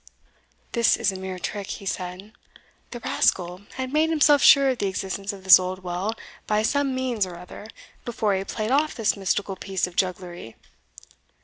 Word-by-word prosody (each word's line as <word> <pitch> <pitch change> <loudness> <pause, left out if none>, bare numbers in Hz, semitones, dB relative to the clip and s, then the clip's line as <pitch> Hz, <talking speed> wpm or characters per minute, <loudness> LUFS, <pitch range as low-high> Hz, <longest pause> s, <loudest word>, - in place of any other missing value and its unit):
"This 235 -2 +3
is 215 -3 +1
a - - -8
mere 190 0 -6
trick," 200 +2 -5
he 200 - -7
said; 185 +2 -5 0.6
"the 240 - -7
rascal 180 -3 0
had 260 +1 -4
made 310 +1 +3
himself 295 -3 +4
sure 275 -1 +7
of 255 - -1
the 200 - 0
existence 195 +1 -3
of 195 -2 -11
this 190 0 +9
old 185 0 -5
well, 185 +5 -3 0.3
by 215 0 +1
some 275 +2 0
means 255 -5 -1
or 175 - -9
other, 180 +4 -11 0.4
before 220 -3 -1
he 190 0 -1
played 215 +3 -4
off 300 +3 +2
this 225 -3 +1
mystical 195 0 -1
piece 190 -1 -2
of 180 -1 -10
jugglery. 180 -10 -3
200 Hz, 180 wpm, -24 LUFS, 185-240 Hz, 0.6 s, this